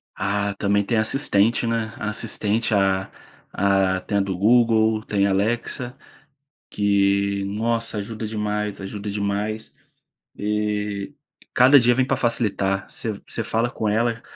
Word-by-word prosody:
Ah, 100 0 -1
também 100 0 +1
tem 115 +3 0
a - - +4
assistente, 115 -2 +2
né. 115 -1 -2
A 110 - -3
assistente 110 0 -1
a 95 -1 +1 0.4
a 95 -1 +2
tem 100 - -2
a - - +2
do 95 -2 -3
Google, 110 0 +3
tem 100 -3 0
a 100 - +1
Alexa, 120 +5 -2 0.7
que 100 -1 +1
nossa 115 +2 -1
ajuda 110 +2 -5
demais, 105 -1 -3
ajuda 100 +1 -5
demais. 105 +2 -3 0.6
E 105 +1 -2 0.4
cada 130 +3 +7
dia 120 0 +4
vem 130 +1 +1
para 135 - 0
facilitar. 105 -5 0
Você 110 - -4
você 115 - -4
fala 115 +3 0
com 110 -3 -2
ela, 115 +2 0
105 Hz, 140 wpm, -22 LUFS, 100-115 Hz, 0.7 s, cada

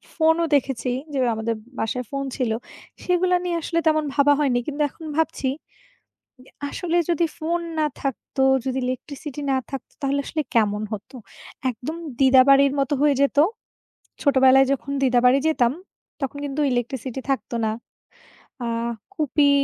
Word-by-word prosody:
ফোনও 325 +1 +3
দেখেছি। 270 -2 0 0.2
যে - - -1 0.2
আমাদের 225 +1 -2 0.2
বাসায় 250 +3 -2
ফোন 275 0 -2
ছিল। 250 -4 0 0.5
সেগুলা 360 0 +2
নিয়ে 350 -1 -1
আসলে 335 +1 -1
তেমন 310 -1 +3
ভাবা 290 0 +5
হয়নি। 270 -5 +2
কিন্তু 300 0 -3
এখন 320 - -13
ভাবছি। 320 -4 0 1.0
ইয়া 255 - -20 0.2
আসলে 345 +1 -2
যদি 340 0 +2
ফোন 340 +2 -1 0.2
না 305 - +3 0.2
থাকতো, 270 0 -2 0.2
যদি 265 0 -1
ইলেকট্রিসিটি 280 +3 -5
না - - +2
থাকতো, 270 -2 -7
তাহলে 280 +1 +1
আসলে 310 - -2
কেমন 210 -2 +2
হতো? 215 +5 -7 0.6
একদম 260 +7 -6 0.2
দিদাবাড়ির 270 +1 +6
মতো 275 +1 +1
হয়ে 295 -1 +4
যেত। 280 - +1 0.9
ছোটোবেলায় 265 -1 +5
যখন 280 +1 -3
দিদাবাড়ি 250 0 +4
যেতাম, 245 -6 +2 0.5
তখন 270 +1 -3
কিন্তু 285 +1 -3
ইলেকট্রিসিটি 250 +1 -3
থাকতো 270 -2 -2
না। 215 - 0 0.9
আ - - -2 0.5
কুপি 295 -1 +2
275 Hz, 140 wpm, -23 LUFS, 255-305 Hz, 1.0 s, দিদাবাড়ির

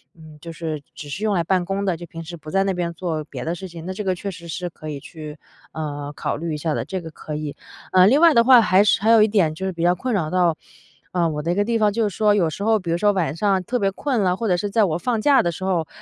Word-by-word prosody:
嗯， 155 -2 -14
就 165 +2 -9
是 155 -3 -4
只 145 - -9
是 200 +9 -4
用 210 - +1
来 170 - +1
办 185 0 +1
公 195 +2 -2
的， 185 -4 0
就 175 - -9
平 165 -1 -9
时 170 +1 -8
不 155 0 -11
在 195 +2 +2
那 195 -1 0
边 175 -1 -2
做 165 -3 -3
别 - - -7
的 165 - -2
事 190 +2 -7
情。 170 -2 -10
那 185 - -4
这 195 +2 -5
个 185 - +1
确 195 +2 -5
实 170 -1 -11
是 175 +2 -4
可 155 -2 -11
以 145 -2 -6
去， 155 0 -9 0.4
呃， 145 -2 -5
考 - - -3
虑 165 0 -4
一 - - -3
下 155 +1 -2
的， - - -2
这 190 -1 -4
个 165 -1 -9
可 155 0 -7
以。 150 -1 -4 0.4
呃， 185 0 +6
另 275 +8 +4
外 335 -2 +7
的 235 -1 +4
话 255 -2 +8
还 190 -2 +4
是 205 - +3
还 220 - +2
有 225 -1 +7
一 215 - +5
点， 195 -8 +2
就 190 +5 -5
是 190 - -2
比 170 -1 -4
较 175 +1 +4
困 250 +7 -3
扰 170 -7 0
到， 175 -2 +2 0.6
嗯， 170 -3 +1
我 150 - -3
的 165 +3 -1
一 175 - 0
个 205 - +2
地 230 +1 +1
方， 210 -2 +3
就 220 +1 0
是 200 - -6
说 210 -1 +3
有 175 -6 +2
时 200 - -6
候， 220 0 +3
比 175 -3 -4
如 170 - +1
说 205 +3 +3
晚 170 -8 -1
上 195 +1 +1
特 245 +5 -2
别 195 - +2
困 250 +3 -1
了， 180 -2 +2
或 230 - -2
者 180 - +3
是 205 +3 -2
在 220 +2 +3
我 160 -4 -1
放 230 +6 -1
假 280 +2 +5
的 170 - 0
时 170 - -8
候， 175 -4 0
180 Hz, 340 characters per minute, -22 LUFS, 160-205 Hz, 0.6 s, 话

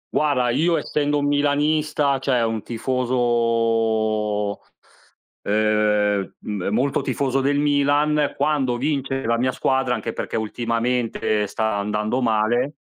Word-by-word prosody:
Guarda, 135 -5 +2
io 165 +6 +2
essendo 145 0 -1
un 145 - 0
milanista, 145 0 +1
cioè 130 -3 +1
un 110 -1 -1
tifoso, 115 -4 0 0.8
ehm, 105 -2 +1
mhmm, 105 -4 -4
molto 130 +5 +1
tifoso 135 -1 -1
del 140 +1 +1
Milan, 145 +1 +2
quando 135 -5 +1
vince 135 -1 -2
la 115 +1 +1
mia 130 +1 +1
squadra, 130 0 0
anche 115 - -4
perché - - -4
ultimamente 115 -1 -1
sta 110 0 -1
andando 105 +4 -1
male 120 +5 +1
125 Hz, 115 wpm, -22 LUFS, 110-140 Hz, 0.8 s, Guarda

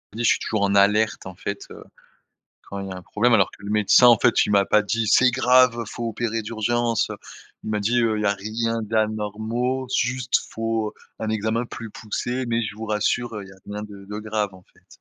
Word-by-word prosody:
Dis, 120 - -3
je - - +4
suis - - +1
toujours 110 -2 -2
en 100 0 +1
alerte 105 +2 +3
en 95 -1 -8
fait, 100 +2 -6
heu, - - -10 0.8
quand 100 - -7
il 100 - -6
y - - -7
a - - -7
un 90 - -9
problème 120 +6 +1
alors 100 -3 +3
que - - -17
le 100 - -5
médecin, 105 +3 +5
en 120 -2 +7
fait, - - +3
il - - -3
m'a 100 -1 +4
pas 105 - +4
dit: 110 +2 -1
«C'est 130 +1 +6
grave, 125 -1 +4
faut 115 +2 -4
opérer 115 0 -2
d'urgence, 115 +1 0
heu!» - - -5 0.5
il 110 - -4
m'a 105 - 0
dit: 120 +4 +1
«Heu, 110 -2 +1
il - - -2
y 105 - +1
a 100 - +2
rien 115 +3 -2
d'anormaux, 110 +4 -1
juste, 125 +1 +1
faut 115 -1 -2 0.3
un 110 - -3
examen 110 +2 -1
plus 115 -2 -8
poussé 120 +5 -3
mais 115 0 0
je 105 - -4
vous 110 - -6
rassure, 110 +2 0
heu, 105 - -5
il 95 - -14
y - - -13
a 95 - -16
rien 105 0 -5
de 100 -2 -10
de 105 +1 -6
grave 105 -2 -2
en 95 - -15
fait.» - - -27
110 Hz, 240 wpm, -23 LUFS, 105-115 Hz, 0.8 s, en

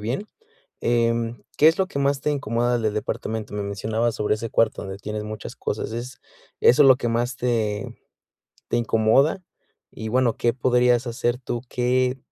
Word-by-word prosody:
bien, 120 - -3 0.5
em, 115 0 0
¿qué 150 - +5
es 165 - +2
lo 190 - +2
que 140 - -5
más 140 0 +1
te 150 - 0
incomoda 120 -3 0
del 110 -2 -1
departamento? 110 0 -4
Me 105 - -2
mencionabas 110 +3 -1
sobre 105 0 0
ese 115 +1 -5
cuarto 115 -1 +1
donde 95 0 -7
tienes 105 +1 -5
muchas 110 0 -7
cosas, - - -3
es 120 +3 -6 0.4
eso 140 +5 +6
es 135 - +7
lo 130 - +7
que 120 - -2
más 120 +2 -1
te 110 -4 -1 0.7
te - - 0
incomoda, 120 - +2 0.5
y 110 - -7
bueno, 125 -1 +2
¿qué 120 - +2
podrías 125 -1 +2
hacer 120 +1 -1
tú? 120 -2 -4
¿Qué 125 +1 +1
120 Hz, 175 wpm, -23 LUFS, 110-125 Hz, 0.7 s, es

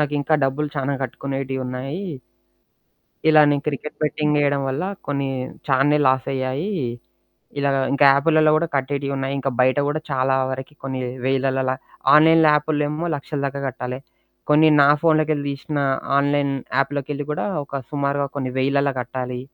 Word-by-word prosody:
నాకింకా 150 +1 0
డబ్బులు 145 +3 -1
చాలా 135 +1 -1
కట్టుకునేటియున్నాయి. 135 - -4 1.3
ఇలానే 150 -2 +6
క్రికెట్ 150 0 -4
బెట్టింగ్ 150 0 0
జేయడం 140 -1 +1
వల్ల 140 +7 -2 0.2
కొన్ని 140 -1 -1 0.4
చానే 140 +2 +3
లాసయ్యాయి. 130 +6 -1 0.9
ఇలాగ 140 -1 +1 0.2
ఇంకా 140 - +4
యాపులలో 155 +2 +3
గుడా 165 +2 +1
కట్టేటియున్నాయి. 140 0 -2
ఇంకా 135 0 -1
బయట 130 +1 +3
గూడా 150 +2 -1
చాలా 130 0 +1 0.2
వరకి 130 +2 -6
కొన్ని 130 -1 -3 0.2
వేలలలా 130 0 0 0.4
ఆన్‌లైన్ 160 +2 +6
యాపుల్లేమో 150 +1 0
లక్షల 145 +1 -5
దాకా 140 0 -3
గట్టాలె. 125 0 -5 0.5
కొన్ని 150 +1 +6
నా 140 - +6
ఫోన్లోకెళ్ళి 155 -3 +2
తీశిన 145 +2 -5 0.4
ఆన్‌లైన్ 140 0 +1 0.2
యాప్లోకెళ్ళి 140 +1 -1
కూడా 150 - -2 0.2
ఒక 140 0 -5
సుమారుగా 140 -1 -1
కొన్ని 130 -2 -3
వెయిలలా 140 +1 +1
కట్టాలి. 125 0 -4
140 Hz, 125 wpm, -21 LUFS, 135-150 Hz, 1.3 s, ఇలానే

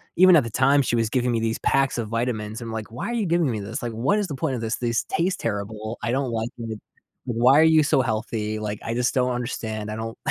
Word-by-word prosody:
even 185 0 +7
at 150 - +5
the 115 - -5
time, 135 +4 +4
she 120 - 0
was 115 -2 +1
giving 125 0 +1
me 115 - +1
these 115 0 -1
packs 135 -1 +1
of 115 -2 -2
vitamins. 115 -1 -2
I'm 115 -1 -6
like, 110 -1 -5
"Why 120 - -5
are - - -2
you 230 -3 0
giving 170 -4 +2
me 110 -3 -2
this, 110 +6 -5
like, 120 -1 -3
what 130 - +1
is 205 - -1
the 145 - -5
point 135 +1 -1
of 120 - -4
this? 115 0 -1
This 115 -2 0
tastes 180 +3 0
terrible. 105 +2 -4
I 115 - 0
don't 135 0 0
like 115 0 -2
it. 110 -2 -5 0.5
Why 125 +4 +4
are - - +7
you 160 -1 +5
so 145 -2 +3
healthy, 110 -2 -2
like, 105 -1 -4
I 115 - -3
just 125 +1 +1
don't 125 -1 +1
understand." 110 -3 -4
I - - -4
don't 115 0 -5
120 Hz, 270 wpm, -24 LUFS, 110-135 Hz, 0.5 s, even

